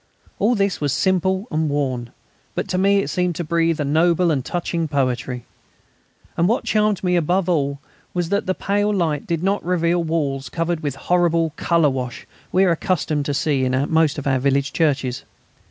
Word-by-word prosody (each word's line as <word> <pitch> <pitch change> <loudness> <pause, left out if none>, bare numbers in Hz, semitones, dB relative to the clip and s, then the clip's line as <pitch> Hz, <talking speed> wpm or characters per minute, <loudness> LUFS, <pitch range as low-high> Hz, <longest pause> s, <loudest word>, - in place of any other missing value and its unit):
All 235 +4 +3
this 200 -4 0
was 145 -2 +1
simple 190 +2 +1
and 155 0 0
worn; 130 -4 -2 0.5
but - - -2
to 185 0 0
me 200 +1 +3
it - - -5
seemed 180 -2 -1
to 175 - -3
breathe 165 0 +1
a 145 - 0
noble 170 +4 +3
and 135 -4 0
touching 170 0 -2
poetry. 130 -3 -1 0.9
And 170 - +2
what 230 +5 +1
charmed 210 -2 +1
me 180 -1 +2
above 175 +2 +1
all 140 -5 0 0.3
was 175 -2 -2
that 200 0 0
the 185 - 0
pale 205 +1 0
light 165 -7 -1
did 170 0 -1
not 195 +2 0
reveal 175 -1 +1
walls 145 -4 -2
covered 165 0 -1
with 145 -4 -3
the 135 - -14
horrible 170 -2 +2
colour 165 -4 +2
wash 125 -2 -5 0.3
we 185 - +4
are 180 - +3
accustomed 160 -4 0
to 145 - -1
see 140 -2 +1
in 130 0 +1 0.2
most 160 -2 +3
of 145 - -5
our 135 -2 +2
village 140 +1 +1
churches. 135 -6 0
165 Hz, 190 wpm, -21 LUFS, 140-180 Hz, 0.9 s, we